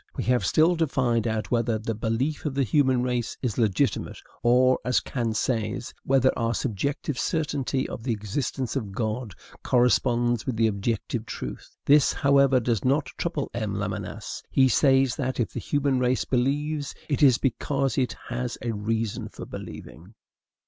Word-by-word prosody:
We - - -1
have 125 +3 +1
still 165 +3 +4
to 160 -1 +2
find 120 -4 +1
out 110 -1 -2
whether 115 -2 +1
the 110 +1 -3
belief 115 +7 -1
of 135 - -3
the 140 - +2
human 130 0 +2
race 125 -2 -2
is 120 -4 -1
legitimate; 105 -5 0 0.2
or, 130 +2 +4
as 125 0 +2
Kant 115 -4 -2
says, 115 +1 -2
whether 130 -1 +3
our 115 -1 0
subjective 135 - -2
certainty 140 -5 -1
of - - -7
the 120 +1 -2
existence 115 +5 -3
of 105 -8 -3
God 110 -1 -3 0.3
corresponds 120 -2 +2
with 130 - -1
the 115 +1 +2
objective 110 +2 -2
truth. - - -7
This, 145 0 +5
however, 140 -2 +4
does 115 -3 -1
not 140 +3 +1
trouble - - -3
M. - - -2
Lamennais. - - -4
He 135 -1 +4
says 135 0 +3
that, 130 -2 -2
if 120 - -1
the - - -3
human 140 -3 0
race 125 0 +1
believes, 145 +3 -1
it 145 -1 -1
is 130 -5 +6
because 135 +1 -1
it 130 -2 0 0.2
has 125 0 -3
a 120 - -1
reason 110 0 -2
for - - -9
believing. 90 +7 -10
125 Hz, 165 wpm, -26 LUFS, 115-135 Hz, 0.3 s, is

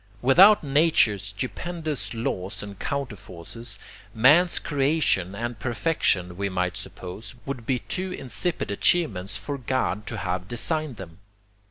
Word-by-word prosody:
Without 185 +12 +7
nature's 140 - +3
stupendous 150 +7 -4
laws 100 -4 -3
and 100 -2 -9
counterforces, 115 -4 -5 0.4
man's 150 +10 +6
creation 135 - +1
and 120 0 -4
perfection, 105 - 0
we 100 0 -1
might 90 -1 -1
suppose, 90 +6 -8
would 130 -5 -5
be 130 - +2
too 185 +8 -4
insipid 155 - -3
achievements 105 - +1
for 140 +8 -5
God 120 -5 -1
to 115 - -4
have 90 -2 -3
designed 155 +4 -2
them. 85 -2 -10
120 Hz, 125 wpm, -25 LUFS, 100-145 Hz, 0.4 s, Without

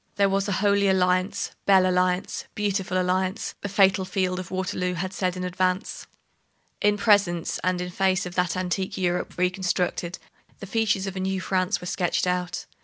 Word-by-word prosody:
There 200 -1 +3
was 195 +1 0
a - - -1
Holy 200 -1 +3
Alliance; 185 0 +1 0.2
Belle 190 -2 +6
Alliance, 180 0 0
Beautiful 195 -3 0
Alliance, 185 +2 -1
the 200 - -4
fatal 195 -1 +4
field 185 -1 -1
of 185 - -7
Waterloo 185 -1 -2
had 185 +2 -3
said 185 -2 -1
in 180 - -4
advance. 185 +1 -1 0.7
In 205 0 +3
presence 200 -5 +2
and 185 0 +1
in 180 0 -4
face 190 0 +1
of 180 - -6
that 180 0 0
antique 185 +1 -2
Europe 180 -1 -1
reconstructed, 180 -1 -1 0.4
the - - -8
features 205 -1 0
of 195 -1 -5
a - - -3
new 190 0 -1
France 185 +1 0
were - - -7
sketched 180 0 0
out. 180 0 -2
185 Hz, 175 wpm, -25 LUFS, 180-195 Hz, 0.7 s, Belle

